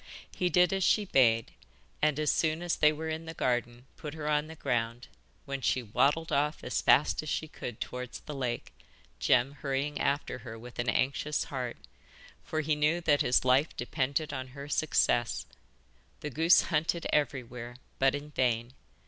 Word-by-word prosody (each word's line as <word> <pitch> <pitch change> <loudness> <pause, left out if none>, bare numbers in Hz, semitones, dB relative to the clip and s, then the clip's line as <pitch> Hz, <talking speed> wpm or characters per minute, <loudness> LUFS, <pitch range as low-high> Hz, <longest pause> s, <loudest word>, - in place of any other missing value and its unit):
He 180 - +1
did 180 0 +4
as 195 -1 0
she 210 +3 +3
bade, 115 - +3 0.5
and 150 -1 +2
as 155 -1 +2
soon 160 +1 0
as 175 -2 0
they 150 - +5
were 160 +1 -4
in 160 +1 -4
the 165 - -6
garden 120 -1 -1
put 150 0 -7
her 155 -1 -5
on 150 0 +1
the 160 - -9
ground, 120 -4 -2 0.4
when 140 -1 -4
she 125 +1 +1
waddled 145 +9 +1
off 150 +1 0
as 125 - -1
fast 145 - +4
as 155 - -6
she 155 - -2
could 120 -6 -7
towards 125 -1 -5
the 150 - -7
lake, 125 -4 -3 0.5
Jem 125 +2 +3
hurrying 140 +1 -2
after 140 -2 -1
her 115 -2 -8
with 120 +2 -11
an 120 0 0
anxious 140 +4 0
heart, 125 -3 -4 0.7
for 155 - -2
he 155 0 +1
knew 150 +3 +2
that 150 -3 +3
his 125 - +3
life 130 +5 +3
depended 135 +5 -1
on 130 0 -4
her 140 +1 -7
success. 120 -5 +1 0.8
The 150 - -4
goose 165 +6 +5
hunted 165 +1 0
everywhere, 125 -4 -1 0.2
but 135 +1 +4
in 145 +1 -7
vain. 120 -3 0
140 Hz, 175 wpm, -30 LUFS, 125-155 Hz, 0.8 s, they